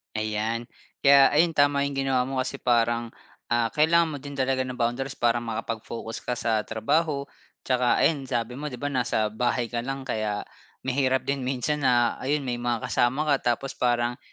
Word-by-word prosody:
Ayan, 110 +2 -2 0.3
kaya 140 -1 +7
ayun 165 +2 +3
tama 145 0 +3
'yung 140 - -5
ginawa 135 -2 +1
mo 135 - -4
kasi 135 +1 -6
parang, 120 -1 +2 0.4
ah, 120 -1 +1
kailangan 160 +2 +3
mo 145 - -4
din 140 +1 -8
talaga 130 -1 0
ng 125 - -5
boundaries 125 +3 -2
para 120 0 +2
makapag-focus 115 0 -5
ka 125 - -3
sa 115 -2 0
trabaho, 140 +6 0 0.4
tsaka 125 -1 +2
ayun 140 -5 +1
sabi 125 +2 -2
mo, 150 - -4
‘di 130 - -6
ba, 145 +4 -3
nasa 115 -5 0
bahay 120 +1 -1
ka 120 - -1
lang 135 +2 -4
kaya 105 -4 -2 0.4
mahirap 130 0 +1
din 135 -2 -2
minsan 135 +3 -1
na 120 -1 +2
ayun, 145 +2 -1
may 120 -2 -3
mga 120 -2 -1
kasama 130 +5 +2
ka 120 -3 +1
tapos 135 +3 -7
parang 120 0 0
125 Hz, 180 wpm, -26 LUFS, 120-140 Hz, 0.4 s, kaya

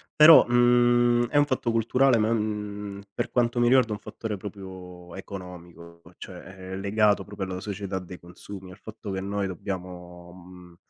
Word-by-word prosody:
Però, 155 +1 +9
mhmm, 120 0 +3
è 145 - -9
un 145 - +5
fatto 130 -4 -1
culturale 120 +3 +3
ma, 110 +1 +1
mhmm, 105 -2 -3
per - - -3
quanto 120 0 +1
mi 120 - +3
riguarda 125 -2 +4
è - - -5
un 105 - -6
fattore 110 -3 -6
proprio 95 -3 -10
economico, 85 -3 -10 0.2
cioè 90 -2 -10
è 95 0 -9
legato 105 +1 +2
proprio 100 -2 -6
alla 90 0 -4
società 100 -1 -5
dei 90 0 -10
consumi, 90 +2 -11
al 90 - -13
fatto 110 -1 -9
che 95 - -3
noi 100 0 -2
dobbiamo, 90 -2 -7
mhmm, 90 -1 -15
100 Hz, 170 wpm, -26 LUFS, 90-115 Hz, 0.2 s, Però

